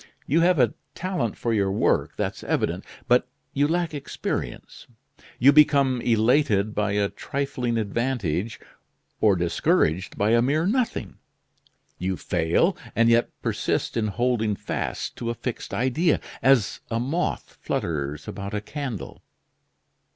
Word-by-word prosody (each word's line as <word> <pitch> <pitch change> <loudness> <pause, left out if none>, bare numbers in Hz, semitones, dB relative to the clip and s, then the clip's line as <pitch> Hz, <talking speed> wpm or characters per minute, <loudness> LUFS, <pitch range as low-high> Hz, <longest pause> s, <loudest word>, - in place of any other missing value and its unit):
You 160 +5 +2
have 180 0 +4
a 125 -5 +3 0.2
talent 175 - -2
for 115 - -1
your 100 -3 +1
work, 100 - +1
that's - - -3
evident; - - -1 0.2
but - - +4 0.3
you 145 +1 +2
lack 170 0 0
experience; 145 -2 -5 0.5
you 140 +4 +6
become 140 -4 +4
elated 110 -2 +2
by 105 -2 0
a 100 -1 +2
trifling 125 -1 -3
advantage, 110 - -1 0.6
or 105 -3 +4
discouraged 85 0 +1
by 105 +2 +2
a 115 0 +5
mere 150 +6 +1
nothing; 235 +4 -1 0.8
you 95 0 -1
fail, 90 - +1 0.2
and 115 0 +4
yet 115 0 +4
persist - - -1
in 110 -2 +1
holding 110 -1 0
fast - - -4
to 115 - -3
a 120 - -2
fixed 125 0 -5
idea, 130 - +1 0.2
as 135 -6 +3
a 115 - -1
moth 150 +9 -2
flutters 75 -2 -3
about 100 +1 -5
a - - 0
candle. 130 - -6
115 Hz, 135 wpm, -25 LUFS, 100-140 Hz, 0.8 s, you